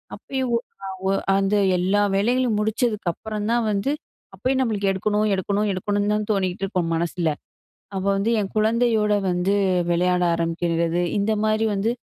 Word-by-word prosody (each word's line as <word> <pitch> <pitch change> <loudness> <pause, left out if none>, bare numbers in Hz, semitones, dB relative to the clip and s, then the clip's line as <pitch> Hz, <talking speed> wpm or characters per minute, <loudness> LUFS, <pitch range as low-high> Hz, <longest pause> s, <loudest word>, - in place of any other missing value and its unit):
அப்பயும் 260 -3 -2 0.8
அந்த 195 +1 +1 0.2
எல்லா 190 +3 +2
வேலைகளையும் 240 +3 +2
முடிச்சதுக்கு 215 -3 0
அப்புறம் 215 +2 -5
தான் 235 -1 +2
வந்து, 205 +7 0 0.4
அப்பயும் 260 +7 0
நம்மளுக்கு 205 -5 0
"எடுக்கணும் 210 +2 0
எடுக்கணும் 200 +2 0
எடுக்கணும்னு" 205 +2 -1
தான் 210 - -1
தோணிட்டு 190 -2 -1
இருக்கும் 180 -4 -1
மனசில. 170 0 -1 0.7
அப்ப 190 0 -2
வந்து 200 +4 0
என் 195 - -3
குழந்தையோட 220 -1 +2 0.2
வந்து 180 +3 +1 0.4
விளையாட 180 +1 +2
ஆரம்பிக்கிறது. 170 0 0 0.2
இந்த 205 +2 +1
மாதிரி 215 +1 +2
வந்து 200 +4 0
205 Hz, 135 wpm, -23 LUFS, 185-220 Hz, 0.8 s, எல்லா